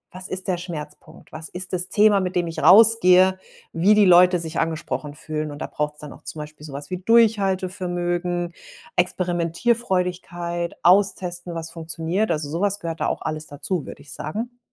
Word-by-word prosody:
„Was 185 Hz, +1 st, -4 dB
ist 185 Hz, 0 st, -4 dB
der 185 Hz, -2 st, 0 dB
Schmerzpunkt? 155 Hz, -4 st, -9 dB
Was 160 Hz, 0 st, -7 dB
ist 185 Hz, +1 st, -6 dB
das 180 Hz, 0 st, -1 dB
Thema, 210 Hz, -1 st, +4 dB
mit 185 Hz, -1 st, -3 dB
dem 175 Hz, -1 st, +1 dB
ich 165 Hz, -1 st, -5 dB
rausgehe, 190 Hz, -3 st, +6 dB, 0.3 s
wie 185 Hz, +6 st, +4 dB
die 210 Hz, -1 st, +5 dB
Leute 180 Hz, 0 st, +6 dB
sich 165 Hz, 0 st, -4 dB
angesprochen 155 Hz, -2 st, -3 dB
fühlen?“ 155 Hz, 0 st, -4 dB
Und 145 Hz, -, -8 dB
da -, -, -3 dB
braucht's 150 Hz, 0 st, -4 dB
dann 150 Hz, -, -9 dB
auch -, -, -16 dB
zum -, -, -6 dB
Beispiel 150 Hz, 0 st, -9 dB
so 150 Hz, -, -9 dB
was 145 Hz, +3 st, -8 dB
wie 185 Hz, -, -2 dB
Durchhaltevermögen, 185 Hz, -5 st, +1 dB, 0.4 s
Experimentierfreudigkeit, 180 Hz, -1 st, -1 dB
austesten, 180 Hz, -2 st, +2 dB
was 165 Hz, 0 st, -5 dB
funktioniert. 165 Hz, +5 st, -2 dB
Also, 155 Hz, -3 st, -1 dB
so 170 Hz, -, -3 dB
was 205 Hz, 0 st, +1 dB
gehört 165 Hz, -4 st, -5 dB
da -, -, +1 dB
auch -, -, -3 dB
alles 155 Hz, 0 st, -4 dB
dazu, 150 Hz, +3 st, -4 dB
würde -, -, -10 dB
ich 145 Hz, -, -10 dB
sagen. 230 Hz, -, -5 dB
175 Hz, 180 wpm, -22 LUFS, 160-190 Hz, 0.4 s, rausgehe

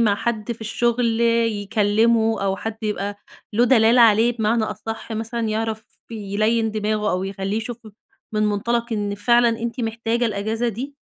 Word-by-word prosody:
مع 210 Hz, -3 st, +4 dB
حد 230 Hz, +1 st, -2 dB
في 230 Hz, -, -13 dB
الشغل 235 Hz, +1 st, 0 dB
يكلّمه، 225 Hz, -1 st, +2 dB
أو 195 Hz, 0 st, 0 dB
حد 225 Hz, +1 st, -5 dB
يبقى 205 Hz, -1 st, -2 dB, 0.4 s
له 240 Hz, +3 st, +4 dB
دلالة 235 Hz, -1 st, +5 dB
عليه 230 Hz, +1 st, +5 dB
بمعنى 220 Hz, 0 st, +1 dB
أصح 225 Hz, +1 st, -6 dB
مثلًا 225 Hz, +1 st, -3 dB
يعرف 220 Hz, 0 st, -2 dB, 0.2 s
يليّن 215 Hz, +1 st, 0 dB
دماغه 215 Hz, 0 st, -1 dB
أو 185 Hz, +1 st, -1 dB
يخلّيه 195 Hz, +1 st, -3 dB
يشوف 225 Hz, +1 st, -4 dB
ف -, -, -10 dB, 0.4 s
من 215 Hz, -, +1 dB
مُنطَلق 230 Hz, +3 st, 0 dB
إن 205 Hz, -1 st, -1 dB
فعلًا 235 Hz, +3 st, +3 dB
أنتِ 230 Hz, +2 st, -3 dB
محتاجة 230 Hz, +1 st, -1 dB
الأجازة 220 Hz, +3 st, -1 dB
دي؟ 265 Hz, +6 st, -6 dB
225 Hz, 155 wpm, -22 LUFS, 210-235 Hz, 0.4 s, دلالة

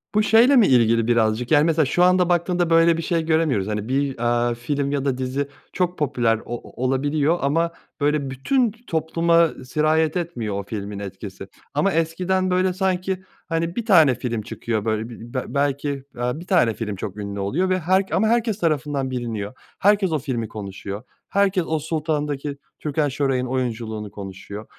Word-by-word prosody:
Bu 215 Hz, -, +4 dB
şeyle 230 Hz, +6 st, +5 dB
mi 230 Hz, -6 st, +6 dB
ilgili 115 Hz, -2 st, +4 dB
birazcık, 115 Hz, 0 st, +1 dB
yani, 150 Hz, -1 st, +6 dB
mesela 160 Hz, -1 st, +3 dB
şu 175 Hz, +6 st, +2 dB
anda 180 Hz, 0 st, +4 dB
baktığımda 175 Hz, 0 st, +1 dB
böyle 165 Hz, 0 st, +5 dB
bir -, -, -2 dB
şey 165 Hz, 0 st, 0 dB
göremiyoruz. 155 Hz, -11 st, +1 dB
Hani, 105 Hz, 0 st, -3 dB
bir, 135 Hz, 0 st, 0 dB
aaa, 120 Hz, 0 st, +1 dB
film 140 Hz, +4 st, -2 dB
ya 140 Hz, -1 st, -1 dB
da 135 Hz, -2 st, 0 dB
dizi 130 Hz, +2 st, -2 dB, 0.3 s
çok 180 Hz, -1 st, -1 dB
popüler 120 Hz, -7 st, +1 dB
o 120 Hz, +1 st, -7 dB
olabiliyor 145 Hz, +5 st, +1 dB
ama, 165 Hz, +5 st, +1 dB, 0.3 s
böyle, 145 Hz, -1 st, +1 dB
bütün 230 Hz, -, +1 dB, 0.2 s
topluma 165 Hz, +1 st, +2 dB, 0.2 s
sirayet 155 Hz, +4 st, +1 dB
etmiyor 140 Hz, -, -3 dB
o -, -, -4 dB
filmin 100 Hz, 0 st, -5 dB
etkisi 95 Hz, -1 st, -8 dB, 0.3 s
ama 195 Hz, -, +2 dB
eskiden, 180 Hz, +3 st, 0 dB
böyle, 185 Hz, 0 st, +2 dB
sanki, 190 Hz, 0 st, -1 dB, 0.3 s
hani, 165 Hz, +1 st, -1 dB
bir 235 Hz, -, -3 dB
tane 160 Hz, -, +6 dB
film 115 Hz, -3 st, -3 dB
çıkıyor, 110 Hz, 0 st, -3 dB
böyle, 110 Hz, +1 st, -1 dB
b 120 Hz, 0 st, -11 dB
b 130 Hz, -, -4 dB
belki, 140 Hz, 0 st, 0 dB
eee, 135 Hz, -3 st, -4 dB
bir 175 Hz, -, -11 dB
tane 165 Hz, -, +3 dB
film 105 Hz, -2 st, -4 dB
çok 100 Hz, +1 st, -6 dB
ünlü 100 Hz, -1 st, -5 dB
oluyor 150 Hz, -, 0 dB
ve 185 Hz, 0 st, +2 dB
her 185 Hz, +3 st, +2 dB
ama 220 Hz, -, +2 dB
herkes 225 Hz, -2 st, +1 dB
tarafından 145 Hz, -5 st, 0 dB
biliniyor. 115 Hz, -4 st, -4 dB, 0.3 s
Herkes 200 Hz, -2 st, +3 dB
o 155 Hz, -, +1 dB
filmi 125 Hz, -5 st, -3 dB
konuşuyor. 100 Hz, 0 st, -7 dB, 0.3 s
Herkes 195 Hz, -2 st, +2 dB
o 160 Hz, -1 st, 0 dB
Sultan'daki 150 Hz, -2 st, -2 dB, 0.2 s
Türkan 150 Hz, 0 st, 0 dB
Şoray'ın 135 Hz, -2 st, 0 dB
oyunculuğunu 115 Hz, -5 st, -3 dB
konuşuyor. 100 Hz, +2 st, -8 dB
145 Hz, 170 wpm, -22 LUFS, 120-170 Hz, 0.3 s, mi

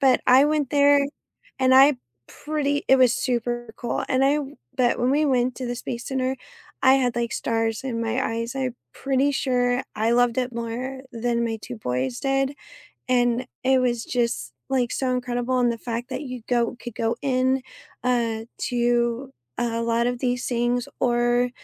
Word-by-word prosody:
But 265 Hz, -2 st, +4 dB
I 260 Hz, +3 st, +7 dB
went 295 Hz, -3 st, 0 dB
there, 285 Hz, 0 st, +5 dB, 0.6 s
and 260 Hz, 0 st, +4 dB
I 275 Hz, +2 st, +8 dB, 0.3 s
pretty 290 Hz, -1 st, -2 dB
it 265 Hz, -, +7 dB
was 255 Hz, -2 st, +5 dB
super 240 Hz, -2 st, -2 dB
cool, 240 Hz, -, -2 dB
and 260 Hz, +1 st, +2 dB
I 285 Hz, +2 st, +3 dB, 0.4 s
but 250 Hz, -2 st, +2 dB
when 245 Hz, +2 st, +2 dB
we 300 Hz, +2 st, +3 dB
went 255 Hz, -2 st, +1 dB
to 255 Hz, -, -4 dB
the 245 Hz, -, -2 dB
space 240 Hz, 0 st, -5 dB
center, 260 Hz, -1 st, -1 dB, 0.5 s
I 260 Hz, 0 st, +7 dB
had, 255 Hz, -3 st, +1 dB
like, 235 Hz, 0 st, -1 dB
stars 225 Hz, +1 st, -1 dB
in 235 Hz, -3 st, -2 dB
my 230 Hz, +3 st, -1 dB
eyes. 230 Hz, +3 st, -3 dB
I 260 Hz, -1 st, -1 dB, 0.2 s
pretty 275 Hz, +1 st, +1 dB
sure 250 Hz, -2 st, +1 dB
I 220 Hz, +2 st, +1 dB
loved 245 Hz, 0 st, +3 dB
it 250 Hz, -1 st, -1 dB
more 245 Hz, +3 st, -4 dB
than 235 Hz, 0 st, 0 dB
my 225 Hz, -1 st, -2 dB
2 250 Hz, -, -7 dB
boys 125 Hz, -, -2 dB
did, 270 Hz, +1 st, 0 dB, 0.5 s
and 245 Hz, 0 st, +2 dB, 0.2 s
it 260 Hz, 0 st, +4 dB
was 240 Hz, -2 st, 0 dB
just, 230 Hz, -, -1 dB, 0.2 s
like, 250 Hz, -3 st, 0 dB
so 260 Hz, -2 st, -1 dB
incredible, 250 Hz, 0 st, -1 dB
and 240 Hz, -1 st, +3 dB
the 230 Hz, -, -6 dB
fact 240 Hz, +2 st, -5 dB
that -, -, -4 dB
you 255 Hz, -4 st, -7 dB
go 240 Hz, 0 st, +1 dB
could 240 Hz, -3 st, -7 dB
go 230 Hz, +1 st, -1 dB
in, 260 Hz, -1 st, +1 dB, 0.4 s
uh, 230 Hz, -3 st, 0 dB
to 240 Hz, +1 st, 0 dB, 0.3 s
a 230 Hz, -1 st, -1 dB
lot 230 Hz, +1 st, +1 dB
of 245 Hz, 0 st, -1 dB
these 245 Hz, -1 st, -1 dB
things 240 Hz, 0 st, 0 dB
or, 240 Hz, 0 st, +2 dB
245 Hz, 180 wpm, -24 LUFS, 235-260 Hz, 0.6 s, I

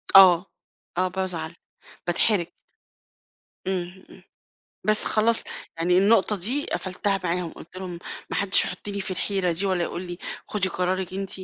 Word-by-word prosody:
آه، 180 Hz, -3 st, +9 dB, 0.5 s
آه 185 Hz, +1 st, +2 dB
بازعل، 180 Hz, -4 st, -3 dB, 0.6 s
باتحرج. 175 Hz, +1 st, +3 dB, 1.2 s
إمم، 185 Hz, 0 st, -3 dB
إمم. -, -, -16 dB, 0.6 s
بس 215 Hz, 0 st, +4 dB
خلاص، 225 Hz, +1 st, +3 dB, 0.4 s
يعني 180 Hz, +2 st, +3 dB
النقطة 205 Hz, +1 st, +4 dB
دي 240 Hz, +11 st, +1 dB
قفُلتها 195 Hz, +1 st, -1 dB
معاهم، 175 Hz, -1 st, -1 dB
قُلت 170 Hz, -, -13 dB
لهم: 185 Hz, -2 st, -6 dB, 0.3 s
"ما -, -, -1 dB
حدّش 200 Hz, -1 st, +5 dB
يحُطّني 200 Hz, -1 st, -5 dB
في 190 Hz, -, -4 dB
الحيرة 185 Hz, -1 st, 0 dB
دي 180 Hz, +5 st, 0 dB
والّا 185 Hz, -2 st, +1 dB
يقول 170 Hz, +1 st, -3 dB
لي 175 Hz, -1 st, -7 dB, 0.3 s
خُدي 195 Hz, -3 st, 0 dB
قرارِك 185 Hz, +1 st, -1 dB
أنتِ 195 Hz, 0 st, -4 dB
185 Hz, 140 wpm, -25 LUFS, 175-195 Hz, 1.2 s, آه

